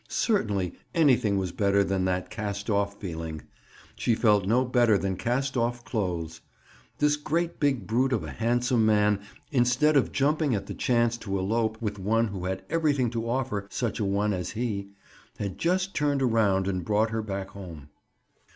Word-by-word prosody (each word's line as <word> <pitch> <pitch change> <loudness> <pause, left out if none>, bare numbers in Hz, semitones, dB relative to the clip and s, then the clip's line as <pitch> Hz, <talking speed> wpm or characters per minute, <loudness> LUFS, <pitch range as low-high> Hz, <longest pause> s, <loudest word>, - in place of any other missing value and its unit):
Certainly 105 - 0 0.2
anything 125 -11 +3
was 95 -2 -1
better 100 +1 +2
than 95 -1 0
that 90 0 -1
cast 100 0 -3
off 100 0 0
feeling. 80 -4 -5 0.5
She 115 - +1
felt 105 -4 +3
no 125 +5 +3
better 120 -4 +3
than 95 -1 -2
cast 130 +7 -1
off 120 0 -1
clothes. 85 -9 -3 0.6
This 150 0 +3
great 165 +3 -2
big 140 -4 +1
brute 125 +4 +1
of 115 - 0
a - - -6
handsome 120 +1 +1
man, 105 -1 +3 0.3
instead 130 +3 +3
of 135 - +3
jumping 145 -1 +1
at 100 -1 -3
the - - -6
chance 120 -1 +1
to 100 -4 -3
elope 110 +3 0
with 105 -2 -3
one 115 +4 +1
who 95 -3 -5
had 95 0 -3
everything 145 -7 +1
to 115 -1 -3
offer 120 -5 -2
such 115 -1 -2
a - - 0
one 100 +1 +1
as 90 -3 -3
he, 105 -5 -2 0.5
had 100 -1 -4
just 185 +3 0
turned 145 -2 +1
around 105 -6 +2
and 90 -2 -1
brought 110 +4 +1
her 110 0 -1
back 100 -2 -4
home. 85 -7 -10
110 Hz, 175 wpm, -27 LUFS, 100-125 Hz, 0.6 s, anything